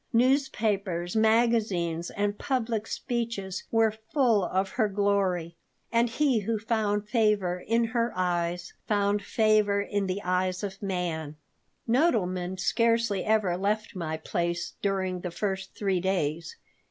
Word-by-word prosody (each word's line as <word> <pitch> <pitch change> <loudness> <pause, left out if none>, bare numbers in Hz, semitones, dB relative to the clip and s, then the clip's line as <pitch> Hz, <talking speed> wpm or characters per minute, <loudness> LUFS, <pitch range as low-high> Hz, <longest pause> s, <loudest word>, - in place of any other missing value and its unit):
Newspapers, 215 -9 +1
magazines, 220 -7 +2
and 205 0 -2
public 230 -5 -1
speeches 230 -6 -3
were 225 -1 +3 0.2
full 240 -9 +3
of 190 +2 0
her 220 0 +1
glory, 195 -4 0 0.4
and 235 +1 +3
he 260 0 +2
who 220 +2 -1
found 210 -2 -1
favor 210 -5 +1
in 230 +2 +3
her 230 +1 0
eyes 175 -1 -1
found 205 -1 +1
favor 215 -1 +2
in 200 -1 -1
the 185 +2 -2
eyes 185 +1 0
of 195 -1 -5
man 170 -6 -3 0.5
Nodelman 190 - +1
scarcely 230 -1 +2
ever 215 -5 +2
left 210 +3 -1
my 160 -3 -3
place 170 +2 -2
during 190 -2 -1
the 180 - -4
first 190 +1 -3
three 195 -3 +1
days. 170 -3 -1
200 Hz, 130 wpm, -28 LUFS, 180-225 Hz, 0.5 s, were